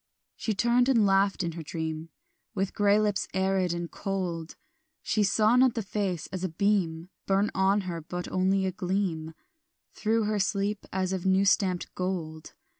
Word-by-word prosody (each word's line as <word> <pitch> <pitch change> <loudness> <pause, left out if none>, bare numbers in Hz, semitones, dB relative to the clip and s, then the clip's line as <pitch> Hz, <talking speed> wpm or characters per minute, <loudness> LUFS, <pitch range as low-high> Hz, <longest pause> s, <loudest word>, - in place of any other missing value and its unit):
She 220 - -2
turned 240 +4 +3
and 230 -5 +4
laughed 195 0 +2
in 170 - -2
her 165 0 -7
dream 160 +1 -4 0.5
With 195 -1 -1
grey 205 0 +3
lips 210 -2 0
arid 190 -1 +1
and 170 0 -4
cold; 180 -5 -4 0.5
She 215 - +1
saw 215 +3 +3
not 255 -1 +4
the 225 - -2
face 190 -5 -2
as 185 -1 -4
a 185 - 0
beam 175 -2 0 0.2
Burn 200 +2 +2
on 195 +2 +2
her, 175 -3 -5
but 180 +3 -5
only 190 +1 +1
a 190 - 0
gleam 180 -4 -2 0.6
Through 225 +1 +1
her 210 0 0
sleep 200 +2 -1
as 190 0 -1
of 190 0 -2
new 190 +1 +4
stamped 185 -2 +1
gold. 165 -4 -4
190 Hz, 170 wpm, -28 LUFS, 175-205 Hz, 0.6 s, and